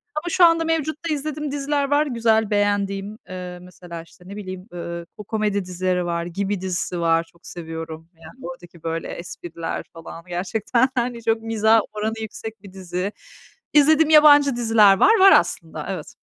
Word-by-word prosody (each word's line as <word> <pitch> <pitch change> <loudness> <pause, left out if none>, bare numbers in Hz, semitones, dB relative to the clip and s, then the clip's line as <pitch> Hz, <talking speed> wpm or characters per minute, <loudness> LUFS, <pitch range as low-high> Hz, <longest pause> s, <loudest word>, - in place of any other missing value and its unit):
Ama 325 +3 -3
şu 350 +1 +5
anda 330 -1 +4
mevcutta 320 0 -1
izlediğim 300 0 -4
diziler 285 0 -1
var 290 +1 +3
güzel, 225 -5 +1
beğendiğim. 205 0 0
Eee, 180 -1 -7
mesela 175 -2 -10
işte 175 - -20
ne 200 - -8
bileyim, 185 -1 -8
ııı, 170 -1 -6
ko 210 - -8
komedi 210 -2 -1
dizileri 180 0 -1
var, 170 -1 -2
Gibi 195 +2 -3
dizisi 180 -1 -2
var. 165 0 +2
Çok 170 - -25
seviyorum. 165 -1 -8
Yani 165 +11 -14
oradaki 175 -10 -11
böyle 165 0 -3
espriler 170 -1 -6
falan 165 0 -10
gerçekten 205 +8 0
hani 240 -1 -2
çok 225 0 +1
mizah 225 0 +3
oranı 215 +1 -2
yüksek 220 0 -7
bir 195 -2 -13
dizi. 185 +1 -4 0.6
İzlediğim 305 +1 +5
yabancı 290 -3 +7
diziler 220 -4 +5
var. 440 - +5
Var 385 +1 +8
aslında. - - +1
Evet. - - -6
205 Hz, 160 wpm, -22 LUFS, 180-265 Hz, 0.6 s, Var